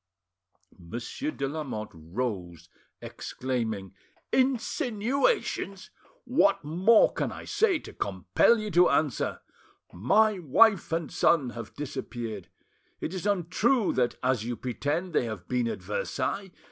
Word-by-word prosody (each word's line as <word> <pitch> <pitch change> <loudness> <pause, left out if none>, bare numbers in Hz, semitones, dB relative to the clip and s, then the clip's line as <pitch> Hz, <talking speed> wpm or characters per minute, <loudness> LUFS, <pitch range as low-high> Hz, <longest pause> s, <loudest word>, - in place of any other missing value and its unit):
Monsieur 115 - -5
de 140 - -3
Lamotte 135 -8 -5
rose, 90 -1 -5 0.3
exclaiming— 110 -7 -4 0.4
"Insinuations! 255 - 0 0.3
What 245 -6 +3
more 185 +9 +4
can - - -2
I - - -8
say 420 -3 +2
to - - -11
compel 95 - +2
you 215 -1 -4
to 175 +1 +5
answer? 150 -5 0 0.5
My 205 - +3
wife 180 - +4
and 165 -2 -1
son 140 -7 +3
have 115 -2 -8
disappeared. 120 - -5 0.5
It 165 - -4
is 190 +1 -3
untrue 205 +5 +2
that, 125 -2 +1
as 125 -3 +1
you 120 +1 -3
pretend, 145 +9 -2
they 125 - +2
have 110 -6 -6
been 125 -2 0
at - - -4
Versailles. 205 - -2
150 Hz, 120 wpm, -28 LUFS, -, 0.5 s, to